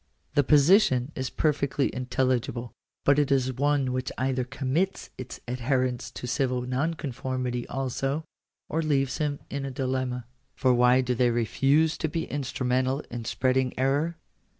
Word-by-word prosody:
The 145 -1 +4
position 145 - +4
is 130 0 -3
perfectly 145 -2 0
intelligible. 125 -1 -1 0.3
But 140 +1 +5
it 145 -2 +1
is 130 -1 +2
one 140 -1 +1
which 130 0 -2
either 130 0 0
commits 135 +8 -2
its 130 -1 -8
adherents 125 0 -1
to - - -6
civil 125 0 0
nonconformity 130 -3 -2
also, 135 +3 -2 0.4
or 160 - -1
leaves 135 -4 0
them 145 -2 0
in 140 0 -3
a 135 - -3
dilemma. 130 -2 -2 0.3
For 130 -2 +3
why 125 +1 +5
do 125 0 0
they 125 0 +3
refuse 135 +7 +2
to 160 - 0
be 165 +2 -2
instrumental 130 -1 0
in 120 -1 -5
spreading 130 +1 0
error? 145 +6 +1
130 Hz, 145 wpm, -27 LUFS, 125-145 Hz, 0.4 s, But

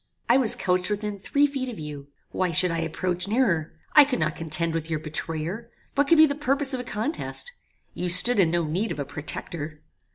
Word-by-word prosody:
I 240 - +5
was 250 -5 +2
couched 180 0 0
within 210 -1 -3
three 285 +8 +2
feet 270 -3 -3
of 230 - -8
you. 150 -2 -8 0.2
Why 185 -1 -1
should 170 +2 +4
I 165 - -2
approach 175 +3 -2
nearer? 200 -9 0 0.2
I 300 - +9
could 275 -2 -1
not 155 -1 -1
contend 165 +1 0
with 165 0 -3
your 160 - -1
betrayer. 165 +7 -5 0.2
What 285 0 +1
could 330 - +5
be 315 - +8
the 285 - -1
purpose 280 -1 -1
of 260 - -2
a - - -4
contest? 250 - -3 0.4
You 180 - -3
stood 180 +6 +6
in 175 -4 +4
no 170 +1 0
need 180 +8 -2
of - - -4
a 140 - -3
protector. 150 +1 -5
180 Hz, 215 wpm, -25 LUFS, 160-250 Hz, 0.4 s, I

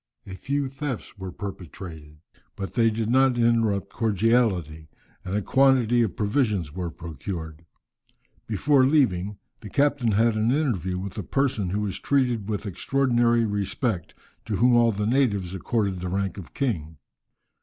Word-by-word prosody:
A 95 - -8
few 140 +8 -2
thefts 135 -2 -5
were 95 -1 -5
perpetrated, 85 -5 -8 0.4
but 95 - -6
they 115 -1 +3
did 110 0 -2
not 130 +1 +3
interrupt 115 -4 +1
cordiality, 100 -8 +1 0.3
and 95 - -4
a 105 - 0
quantity 130 -3 +4
of 110 -5 0
provisions 105 - 0
were 90 -1 -3
procured. 80 -1 -7 0.8
Before 130 +6 +3
leaving, 105 - +2 0.2
the 105 - -9
captain 140 -5 +2
had 115 +2 +3
an 110 +1 +1
interview 115 - 0
with 100 +3 -5
a - - -1
person 120 - 0
who 100 +3 -1
was 100 -3 -3
treated 125 -7 0
with 105 0 -3
extraordinary 120 +3 +2
respect, 100 - -2 0.3
to 105 - -2
whom 120 +4 +4
all 120 -1 +5
the 105 0 -2
natives 105 -7 +1
accorded 95 0 -1
the 90 0 -4
rank 95 +1 -2
of 90 - -12
king. 80 - -2
105 Hz, 150 wpm, -25 LUFS, 95-120 Hz, 0.8 s, all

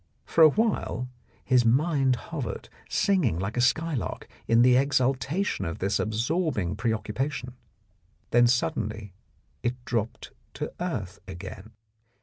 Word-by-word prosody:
For 165 - +4
a 155 - +10
while 175 - -1 0.4
his 125 -2 +4
mind 135 +2 +3
hovered, 125 -5 -6 0.2
singing 175 - +2
like 95 +4 -3
a 125 - +1
skylark 145 +1 0 0.2
in 115 +1 +5
the 125 0 +6
exultation 135 - +1
of 85 -2 -3
this 95 +2 0
absorbing 110 - 0
preoccupation, 125 +4 -2 0.8
then 120 0 +6
suddenly 110 - -1 0.5
it 120 0 -3
dropped 115 -2 -3 0.2
to - - -4
earth 105 - -3
again. 95 +4 -9
125 Hz, 120 wpm, -27 LUFS, 110-145 Hz, 0.8 s, a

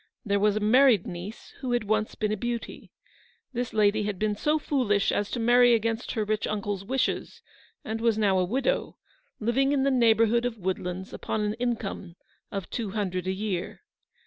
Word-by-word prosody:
There 200 -1 +1
was 210 0 +3
a - - +1
married 235 -2 +5
niece, 180 +5 -8
who 255 -3 -2
had 240 -2 +1
once 215 +1 0
been 210 -1 -1
a - - +1
beauty. 235 +2 -5 0.6
This 245 0 -2
lady 215 0 +3
had 205 -2 -2
been 210 +1 0
so 300 +8 +1
foolish 245 -9 +1
as 205 - -1
to 245 - -3
marry 240 +1 +5
against 225 +1 -2
her 220 -3 -1
rich 215 0 -1
uncle's 205 -2 -3
wishes, 255 +5 -2 0.4
and 220 +1 -3
was 230 -2 +2
now 200 -3 +3
a - - +3
widow, 265 - -1 0.4
living 265 +5 +2
in 270 -2 +2
the 275 - +2
neighbourhood 230 -1 +4
of 245 -2 -2
Woodlands 185 -1 -4
upon 220 - -3
an 210 0 0
income 230 -6 -3 0.4
of 195 -2 -4
two 225 -4 -3
hundred 185 -3 -2
a - - +1
year. 190 -2 -4
215 Hz, 185 wpm, -27 LUFS, 200-240 Hz, 0.6 s, married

